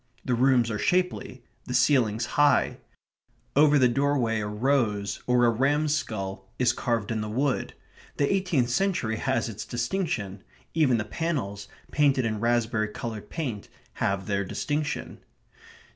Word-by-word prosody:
The 125 - 0
rooms 125 -1 +3
are 105 - -2
shapely, 180 +5 0 0.2
the 125 - -3
ceilings 120 -5 +3
high; 145 -1 +3 0.8
over 150 +1 +6
the 130 -2 +5
doorway 125 -3 +1
a 105 - -3
rose, 105 -2 0
or 125 -1 +4
a 120 - +4
ram's 145 +5 +1
skull, 95 -8 -4
is 125 - +3
carved 115 -3 -1
in 110 -1 -1
the 105 - -4
wood. 130 +4 -1 0.4
The 140 +5 +2
eighteenth 175 -11 +1
century 170 - 0
has 130 +1 0
its 110 -2 -6
distinction. 120 - -3 0.3
Even 145 -7 +3
the 110 - -2
panels, 110 -8 -3 0.2
painted 140 -4 +3
in 110 -2 -1
raspberry 115 -1 +1
coloured 110 0 -6
paint, 125 -11 -4 0.3
have 95 0 0
their 100 -2 0
distinction.... 145 +9 -3
120 Hz, 145 wpm, -26 LUFS, 110-145 Hz, 0.8 s, over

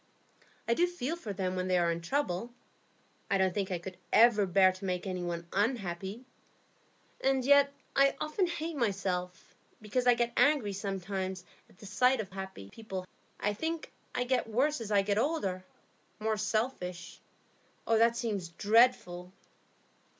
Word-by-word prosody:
I 230 - +3
do 350 +9 +3
feel 335 -3 -3
for 245 -12 -6
them 185 -1 -2
when 185 0 -2
they 185 -1 +2
are 170 -1 +2
in 170 0 -3
trouble; 230 0 -2 0.8
I 195 - +3
don't 190 -1 +2
think 195 -1 -2
I 180 - -1
could 180 +1 -9
ever 215 -3 +5
bear 185 +1 +5
to 185 +1 -9
make 180 0 -2
any 185 -2 -3
one 170 -1 -3
_un_happy; 200 -1 -2 1.0
and 265 -1 +2
yet 280 0 +6 0.2
I 275 0 +4
often 310 +5 0
hate 335 -1 -4
myself, 190 -7 -2 0.3
because 245 +4 -1
I 245 - +7
get 235 0 0
angry 280 -9 +3
sometimes 190 -1 -4 0.2
at - - -22
the 205 - -13
sight 250 +6 +3
of 200 -3 -4
happy 190 - -8
people. 195 -5 -6 0.3
I 205 - 0
think 320 +8 -4 0.2
I 250 - +1
get 255 -1 0
worse 265 +5 +1
as 220 - -5
I 200 -1 +4
get 200 +1 +1
older, 200 - -1 0.6
more 220 0 0
selfish. 210 -4 -3 0.7
That 230 +1 +3
seems 205 -7 -2
very 170 - -21
dreadful." 210 -5 +3
205 Hz, 160 wpm, -31 LUFS, 185-250 Hz, 1.0 s, I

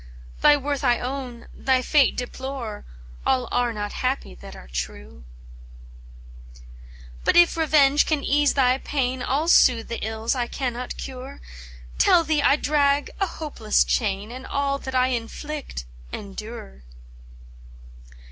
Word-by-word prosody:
Thy 295 0 +6
worth 285 0 -3
I 245 -3 +3
own, 250 -2 -5
thy 260 -1 +1
fate 280 -1 +3
deplore, 250 -3 -5 0.4
All 255 -2 +1
are 245 -1 +1
not 205 -2 -5
happy 255 - -2
that - - -12
are - - -12
true." 60 +2 -6 2.0
"But - - +2
if 345 0 +6
revenge 295 -3 +4
can 305 -3 0
ease 290 0 +2
thy 260 -1 +3
pain, 260 -3 -2
I'll 285 +5 0
soothe 240 -8 +5
the 235 - -4
ills 220 +1 -1
I 245 -3 -1
cannot 250 -1 -4
cure, 265 +1 -8 0.6
Tell 340 - +5
thee 310 -2 +1
I 280 - +5
drag 290 -1 +1
a 390 - +1
hopeless 290 -11 0
chain, 205 -1 -1
And 260 +1 -8
all 280 0 -1
that 265 -1 -6
I 255 0 +3
inflict 255 - -5 0.3
endure!" 200 - -8
255 Hz, 135 wpm, -24 LUFS, 230-280 Hz, 2.0 s, Thy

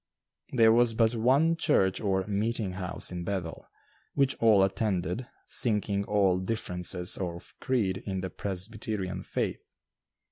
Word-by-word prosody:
There 115 -3 +5
was 115 0 +4
but 115 0 +3
one 135 +8 +3
church 120 - +2
or 95 -3 0
"meeting 105 0 -1
house" 90 0 -5
in 90 -1 -4
Bethel, 90 -3 -4 0.5
which 140 -1 +3
all 110 -4 +5
attended, 95 +2 -1 0.2
sinking 105 -3 +1
all 100 -3 +2
differences 90 -2 -1
of 85 -2 -5
creed 105 -8 0
in 95 -1 -2
the 95 - -5
Presbyterian 100 0 -4
faith. - - -3
100 Hz, 130 wpm, -28 LUFS, 95-115 Hz, 0.5 s, There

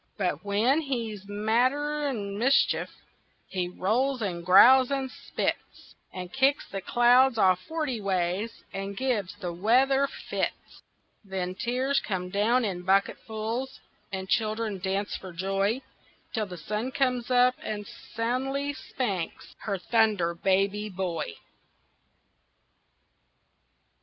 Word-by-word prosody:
But 180 -6 -1
when 220 +9 +2
he's 230 -8 -4
madder'n 245 +2 0
mischief, 255 +6 +2 0.6
He 180 -2 -2
rolls, 245 +9 0
and 175 -4 -3
growls, 250 +8 +7
and 270 -2 -2
spits, - - -4 0.2
And 180 -1 -7
kicks 270 +2 +2
the 195 - -5
clouds 245 +4 +4
all 185 -3 +5
forty 265 - -4
ways, 190 +3 -1
And 195 0 -5
gives 230 -9 -1
the 180 -4 -5
weather 260 +9 +3
fits. - - -5 0.4
Then 190 -2 -3
tears 255 +7 0
come 180 -3 -4
down 230 +5 +2
in 185 -4 -3
bucketfuls, 220 +6 -1 0.3
And 190 -1 -4
children 215 -1 0
dance 195 +2 -2
for 185 - -8
joy, 195 +7 -1 0.5
Till 220 -3 -1
the 180 -2 -8
sun 215 +8 -3
comes 255 -3 0
out 250 0 +5
and 210 -1 -4
soundly 265 +7 -3
spanks 200 - -4
Her 200 -2 -2
Thunder 210 -4 +2
Baby 195 +4 +1
Boy. 185 -3 -3
215 Hz, 115 wpm, -27 LUFS, 190-255 Hz, 0.6 s, growls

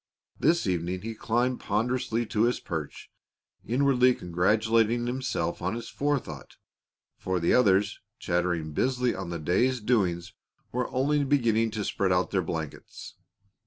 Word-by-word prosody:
This 165 +4 +2
evening 90 0 -1
he 115 +1 -4
climbed 120 +3 0
ponderously 120 +2 -1
to 110 +1 +1
his 120 - 0
perch, 80 -5 -6 0.5
inwardly 125 0 +3
congratulating 110 +6 +1
himself 125 -7 -2
on 95 +5 -1
his 115 0 -6
forethought, 140 - -3 0.6
for 95 -1 -1
the 85 - +2
others, 105 -3 +3 0.2
chattering 85 -3 -1
busily 125 - +1
on - - -5
the 85 - -3
day's 110 +11 +1
doings, 95 -7 0 0.4
were 125 0 -2
only 145 +3 +1
beginning 115 -5 +2
to 105 - -2
spread 95 -2 0
out 90 0 +1
their 95 - +1
blankets. 80 -3 -6
110 Hz, 135 wpm, -27 LUFS, 90-125 Hz, 0.6 s, inwardly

